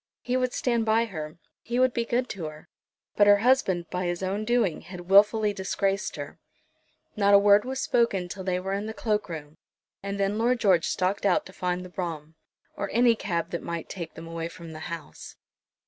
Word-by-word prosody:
He 250 - -1
would 255 -1 +1
stand 235 -3 0
by 225 +1 +3
her; 155 -7 -7 0.2
he 240 +1 -3
would 255 -1 +3
be 235 - -1
good 245 +2 0
to 185 -5 -5
her; 155 0 -9 0.5
but 205 - +5
her 205 0 +8
husband 200 -7 +2
by 180 0 -2
his 175 +1 -3
own 200 +3 -2
doing 230 -8 +1
had 180 0 -10
wilfully 210 +1 +5
disgraced 195 0 -1
her. - - -8 0.8
Not 200 -2 +5
a - - +10
word 205 +1 +5
was 265 +1 -3
spoken 215 -7 +1
till 190 +2 -7
they 180 -1 0
were 190 +1 -3
in 200 +2 -2
the 220 - -6
cloak 210 -3 -1
room, 155 -2 -8 0.4
and 200 0 -4
then 200 +2 0
Lord 240 +2 +2
George 185 -7 +3
stalked 190 +2 -1
out 200 - +2
to 190 - -12
find 180 0 -2
the - - -10
brougham, 165 -4 -5 0.4
or - - -3
any 235 +1 +5
cab 170 -6 -3
that 170 - -3
might 170 -1 -5
take 170 -4 -7
them 165 - -9
away 165 0 -4
from 170 -1 -11
the 155 - -8
house. 165 - -8
195 Hz, 210 wpm, -27 LUFS, 175-220 Hz, 0.8 s, a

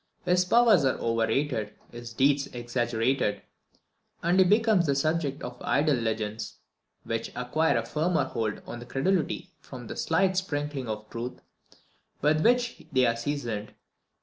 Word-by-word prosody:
His 180 +1 +3
powers 220 -4 +5
are 130 - +2
overrated, 115 0 0 0.2
his 120 0 -8
deeds 140 +3 +2
exaggerated, 120 -2 -1 0.8
and 175 +3 +3
he - - +8
becomes 210 -3 +3
the 140 - +2
subject 150 -1 0
of 125 0 -7
idle 150 +1 +2
legends, 110 -2 -3 0.5
which 115 0 -3
acquire 135 +3 +1
a 115 - -1
firmer 160 +7 +1
hold 110 -2 -3
on 120 0 -7
credulity 160 +7 -1
from 125 -3 -10
the - - -7
slight 185 +3 +1
sprinkling 145 -7 -2
of 110 0 -5
truth 120 +2 -5 0.8
with 155 +2 +2
which 245 0 +2
they 130 -2 +4
are 115 - +2
seasoned. 115 -4 -4
135 Hz, 140 wpm, -27 LUFS, 115-160 Hz, 0.8 s, he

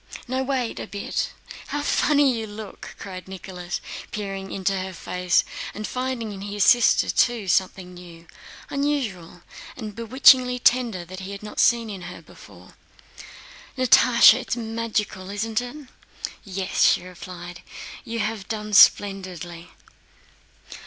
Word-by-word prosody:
"No, 260 +1 -1
wait 260 -3 -2
a - - -6
bit.... 200 0 -3
Oh, - - -16
how 290 - -3
funny 290 -3 +3
you 225 -1 -4
look!" 210 0 -9
cried 185 -2 -8
Nicholas, 185 -1 -6 0.3
peering 195 -2 -5
into 195 0 -1
her 185 0 -5
face 180 +1 +1 0.3
and 215 - -5
finding 250 -3 -3
in 195 -1 -8
his 205 0 -1
sister 240 +2 +5
too 235 -5 +1
something 185 0 0
new, 170 -2 -13 0.5
unusual, 240 - -2 0.3
and 215 -3 -6
bewitchingly 250 +2 +5
tender 240 -7 +2
that 185 +2 -9
he 195 +1 -7
had 200 - -9
not 210 - -7
seen 235 -1 +4
in 200 -3 -7
her 180 - -9
before. - - -16 1.0
"Natásha, 250 -1 +6
it's 250 - -3
magical, 220 -4 -3
isn't 215 +3 -1
it?" 260 +3 -9 0.6
"Yes," 190 -1 -3
she - - +4
replied. 175 -1 -9 0.4
"You 230 0 -3
have 215 -2 -3
done 210 -2 -5
splendidly." 185 -4 +3
205 Hz, 135 wpm, -24 LUFS, 185-240 Hz, 1.0 s, Natásha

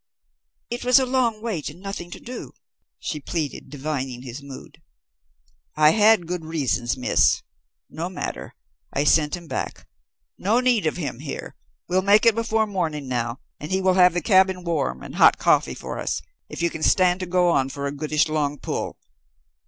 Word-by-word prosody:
"It 240 - -3
was 250 +1 +6
long 255 -3 +2
to - - -19
wait, 210 -10 -3
and 155 +4 -13
nothing 195 -3 -6
to - - -9
do," 250 +1 -8 0.4
she 150 - -4
pleaded, 150 -2 -4
divining 135 -3 -4
his 130 +2 -8
mood. 140 -2 -11 0.9
"I 155 0 +6
had 210 -2 +4
good 175 0 -4
reasons, 130 - -1
Miss. 125 - +2 0.4
No 170 +3 -5
matter. 185 - -6 0.4
I 140 - 0
sent 150 +2 +3
him 170 - -12
back. - - -5 0.5
No 215 +6 +2
need 245 -8 +2
of 155 - -1
him 145 -8 -4
here. 145 0 -6 0.3
We'll 185 +1 +2
make 205 +4 +4
it 230 - +7
before 225 0 +1
morning 165 -8 -3
now, 120 0 -2 0.2
and 150 - -7
he 190 - +2
will 190 -1 +3
have 180 -1 +5
the 175 - +1
cabin 190 0 +3
warm 145 - -2
and - - -8
hot - - +6
coffee - - +2
for - - -6
us, - - -2 0.3
if - - -5
you 170 - +2
can 160 - -7
stand 180 +2 +3
to 185 - -4
go 180 0 +3
on 135 -5 +2
for 140 +1 -5
a 140 - -1
goodish 150 +2 0
long 150 -2 -1
pull." - - -4
170 Hz, 185 wpm, -23 LUFS, 145-190 Hz, 0.9 s, it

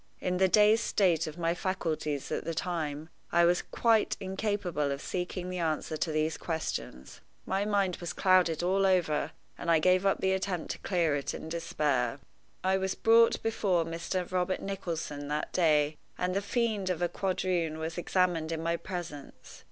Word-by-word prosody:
In 180 0 -1
the 190 +1 +4
dazed 210 +4 +5
state 170 -6 +2
of 155 +1 -7
my 165 -1 +1
faculties 160 -6 -2
at - - -1
that 165 0 -3
time, 160 -4 -3 0.2
I 170 0 +5
was 175 +1 +3
quite 225 -2 +2
incapable 190 -6 -1
of 140 - -3
seeking 180 +2 -4
the 180 - -3
answer 160 -1 -1
to 155 +1 -1
these 155 +1 0
questions. 155 - -4 0.2
My 195 +1 0
mind 200 -3 +1
was 175 - -5
clouded 180 -4 +3
all 195 +2 +3
over, 175 -5 +1 0.3
and 170 - -4
I 165 - +6
gave 185 +4 +3
up 195 -1 +2
the 190 - +1
attempt 190 -2 -2
to - - -6
clear 170 -6 +1
it 140 - -3
in 160 - -7
despair. 145 -6 -1 0.4
I 190 +1 +3
was 190 0 -1
brought 230 +1 +4
before 195 -7 +1
Mr. 170 +2 -3
Robert 185 0 0
Nicholson 165 -7 -4
that 150 +1 -3
day, 155 -3 +3 0.2
and 180 0 -1
the 200 - +1
fiend 215 -3 -1
of 175 -1 -1
a - - +3
quadroon 180 -3 -1
was 160 +2 -4
examined 175 -3 +1
in 165 0 -3
my 170 +1 0
presence. 165 -6 -8
175 Hz, 175 wpm, -30 LUFS, 160-190 Hz, 0.4 s, I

